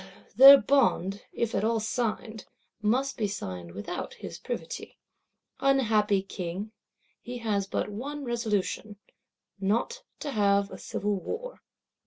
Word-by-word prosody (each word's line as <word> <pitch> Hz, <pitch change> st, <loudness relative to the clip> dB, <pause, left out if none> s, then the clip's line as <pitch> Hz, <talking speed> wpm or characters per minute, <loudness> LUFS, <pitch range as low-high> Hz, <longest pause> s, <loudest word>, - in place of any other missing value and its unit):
Their 275 Hz, +1 st, +11 dB
Bond, 205 Hz, -9 st, +2 dB
if 230 Hz, -1 st, -2 dB
at 195 Hz, -, 0 dB
all 225 Hz, +1 st, +2 dB
signed, 220 Hz, -1 st, -3 dB, 0.4 s
must 255 Hz, +6 st, +1 dB
be 215 Hz, -4 st, 0 dB
signed 90 Hz, -, -6 dB
without 100 Hz, -, -5 dB
his -, -, -8 dB
privity.—Unhappy 220 Hz, -7 st, -1 dB
King, 195 Hz, +2 st, -5 dB, 0.5 s
he 245 Hz, 0 st, -6 dB
has 210 Hz, -4 st, -1 dB
but -, -, -1 dB
one 275 Hz, +8 st, -5 dB
resolution: 220 Hz, -3 st, -2 dB, 0.6 s
not 230 Hz, -, 0 dB, 0.2 s
to 290 Hz, -, -3 dB
have 200 Hz, -3 st, +2 dB
a -, -, -8 dB
civil 205 Hz, -1 st, -2 dB
war. -, -, -6 dB
215 Hz, 120 wpm, -28 LUFS, 200-250 Hz, 0.6 s, Their